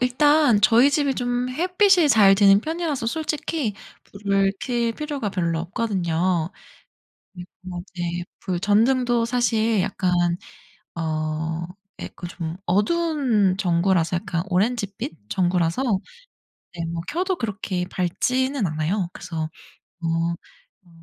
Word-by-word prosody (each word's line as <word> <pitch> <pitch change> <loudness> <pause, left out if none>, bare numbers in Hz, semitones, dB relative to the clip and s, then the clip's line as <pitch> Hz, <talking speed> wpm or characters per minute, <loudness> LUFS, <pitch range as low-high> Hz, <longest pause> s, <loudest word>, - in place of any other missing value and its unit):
일단 255 -2 +4
저희 235 +5 +6
집이 285 -2 +1
좀 245 0 -1
햇빛이 360 +3 +3
잘 205 -6 +6
드는 200 0 +6
편이라서 315 -5 -2
솔직히 305 -4 -2 0.3
불을 195 -1 0
켤 235 -2 0
필요가 290 -7 -3
별로 170 -3 -1
없거든요. 175 -4 -1 0.8
그리고 180 -1 -9
네 175 0 -3 0.2
불 185 -3 -2
전등도 235 +3 +3
사실 230 -3 +1
약간 185 -1 -1 0.8
어 160 0 -2 0.4
예 - - -5
그 175 - -7
좀 165 -1 -5
어두운 220 - +2
전구라서 175 -1 +1
약간 170 -1 -3
오렌지빛 195 - -2
전구라서 175 +3 +1 0.9
네 170 -1 -3
뭐 165 0 -4
켜도 360 +5 -1
그렇게 200 - -3
밝지는 255 +8 0
않아요. 165 +4 -1
그래서 160 -2 -5 0.5
어. 165 - -2 0.8
어 - - -22
200 Hz, 235 characters per minute, -23 LUFS, 175-250 Hz, 0.9 s, 저희